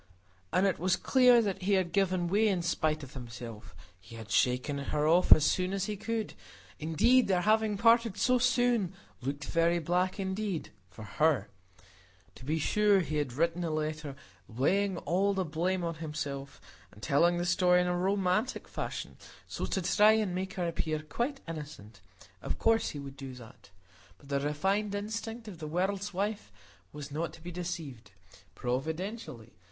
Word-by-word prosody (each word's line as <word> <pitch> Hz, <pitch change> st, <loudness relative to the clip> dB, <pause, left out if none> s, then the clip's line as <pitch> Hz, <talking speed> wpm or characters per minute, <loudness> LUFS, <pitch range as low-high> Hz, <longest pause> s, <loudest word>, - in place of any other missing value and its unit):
And 185 Hz, -, +3 dB
it 195 Hz, -, +1 dB
was 180 Hz, +1 st, +2 dB
clear 250 Hz, +2 st, +5 dB
that 200 Hz, -3 st, -2 dB
he 200 Hz, +2 st, +1 dB
had 185 Hz, -3 st, +1 dB
given 185 Hz, -3 st, +1 dB
way 210 Hz, +5 st, +3 dB
in 185 Hz, -4 st, 0 dB
spite 155 Hz, -2 st, 0 dB
of 135 Hz, +1 st, -10 dB
himself: 115 Hz, -7 st, -9 dB, 0.2 s
he 110 Hz, +5 st, -13 dB
had 110 Hz, -1 st, -9 dB
shaken 125 Hz, +3 st, +1 dB
her 150 Hz, +2 st, -1 dB
off 175 Hz, +3 st, +3 dB
as 155 Hz, -, +9 dB
soon 185 Hz, +1 st, +1 dB
as 195 Hz, -1 st, -1 dB
he 210 Hz, -, -3 dB
could; 220 Hz, +1 st, -3 dB, 0.5 s
indeed, 215 Hz, -, +3 dB
their 185 Hz, -2 st, +2 dB
having 215 Hz, +1 st, +2 dB
parted 230 Hz, -1 st, +4 dB
so 250 Hz, +3 st, +3 dB
soon 245 Hz, -6 st, +2 dB, 0.3 s
looked 140 Hz, +3 st, -4 dB
very 170 Hz, +3 st, +2 dB
black 180 Hz, +4 st, 0 dB
indeed—for 175 Hz, -, -5 dB
her. 140 Hz, -2 st, +1 dB, 0.8 s
To -, -, -14 dB
be 155 Hz, +5 st, -1 dB
sure, 205 Hz, +4 st, +3 dB
he 155 Hz, -3 st, -3 dB
had 145 Hz, -5 st, -2 dB
written 170 Hz, +5 st, 0 dB
a 165 Hz, -, -1 dB
letter, 155 Hz, -2 st, -3 dB, 0.3 s
laying 185 Hz, -, +1 dB
all 195 Hz, +4 st, +1 dB
the 190 Hz, -1 st, 0 dB
blame 175 Hz, +4 st, -1 dB
on 170 Hz, -1 st, -1 dB
himself, 145 Hz, -3 st, -5 dB, 0.3 s
and 100 Hz, -, -16 dB
telling 170 Hz, +8 st, +3 dB
the 175 Hz, -, -1 dB
story 180 Hz, 0 st, +4 dB
in 180 Hz, -, +2 dB
a 180 Hz, 0 st, 0 dB
romantic 195 Hz, +5 st, 0 dB
fashion -, -, -5 dB, 0.3 s
so -, -, -4 dB
as -, -, -7 dB
to 190 Hz, -, -1 dB
try 210 Hz, +4 st, +5 dB
and 215 Hz, -4 st, 0 dB
make 185 Hz, +1 st, -3 dB
her 180 Hz, -2 st, -1 dB
appear 155 Hz, -2 st, -2 dB
quite 240 Hz, -, -3 dB
innocent; 145 Hz, -10 st, -8 dB, 0.4 s
of -, -, -3 dB
course 225 Hz, 0 st, +2 dB
he 145 Hz, -, -6 dB
would 140 Hz, -1 st, -8 dB
do 135 Hz, -2 st, -8 dB
that! 120 Hz, -2 st, -14 dB, 0.5 s
But 140 Hz, -, -18 dB
the 140 Hz, 0 st, +1 dB
refined 195 Hz, +9 st, 0 dB
instinct 225 Hz, +2 st, -5 dB
of 185 Hz, -6 st, -9 dB
the 155 Hz, -, -5 dB
world's 190 Hz, +5 st, -1 dB
wife 205 Hz, +3 st, -3 dB, 0.4 s
was 145 Hz, -1 st, -8 dB
not 160 Hz, +3 st, -3 dB
to 160 Hz, -, -14 dB
be 175 Hz, -, -6 dB
deceived; 165 Hz, -10 st, -6 dB, 0.5 s
providentially! 145 Hz, -, -4 dB
175 Hz, 175 wpm, -30 LUFS, 150-200 Hz, 0.8 s, as